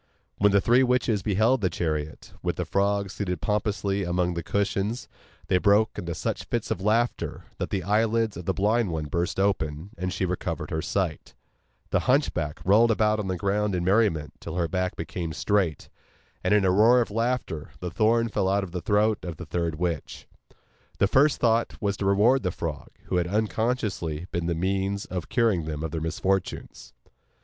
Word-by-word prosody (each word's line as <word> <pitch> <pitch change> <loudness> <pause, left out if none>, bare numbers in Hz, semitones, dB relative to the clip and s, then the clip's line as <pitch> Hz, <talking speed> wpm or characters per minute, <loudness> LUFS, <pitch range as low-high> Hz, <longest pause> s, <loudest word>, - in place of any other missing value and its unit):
When 105 0 +5
the 100 - +5
three 120 +5 +4
witches 125 -5 +2
beheld 110 +6 +2
the 95 - +2
chariot, 80 -2 -3
with - - -1
the - - -3
frog 100 0 0
seated 90 -5 -3
pompously 100 0 -1
among 90 0 0
the 85 - -3
cushions, 100 +5 -1 0.4
they 90 - +2
broke 105 +2 +3
into 85 -1 -4
such - - -3
fits - - -2
of - - -2
laughter 115 +4 0 0.2
that - - -2
the 95 -3 -2
eyelids 110 +2 +1
of 85 - -7
the 95 - +1
blind 105 +2 +2
one 80 -2 -3
burst 85 +5 -2
open, 95 -3 -1
and 90 +1 -2
she 95 - -1
recovered 85 -4 -3
her 80 - -1
sight; 85 -2 -2 0.6
the - - +3
hunchback 90 - +1
rolled 110 +5 +5
about 110 -1 +2
on 105 - -3
the 95 -1 -2
ground 100 +1 0
in 90 - -1
merriment 90 -6 +2
till 85 - -7
her 85 -2 +1
back 90 +1 -1
became 80 0 -4
straight, 95 -5 0 0.6
and 90 - +1
in 105 -2 +4
a 95 - +4
roar 110 +6 +6
of 115 - -1
laughter 115 -9 -2
the 90 -1 -4
thorn 115 +3 +2
fell 95 -4 0
out 100 +1 +1
of 95 - -7
the 90 0 -4
throat 105 +4 +2
of 85 -4 -6
the 90 - -7
third 85 +1 -2
witch. 85 -2 -3 0.7
Their 100 - +3
first 140 +4 +4
thought 115 -1 +1
was 100 -2 0
to 100 - -1
reward 110 +7 +4
the 90 - 0
frog, 80 -4 -5
who - - -1
had 85 -1 +1
unconsciously 105 -5 -1
been 85 -1 -2
the 85 - 0
means 95 +3 -1
of 90 -3 -5
curing 110 -10 +2
them 75 -1 -4
of 80 - -3
their 80 0 -3
misfortunes. 90 -5 -2
95 Hz, 190 wpm, -26 LUFS, 85-110 Hz, 0.7 s, roar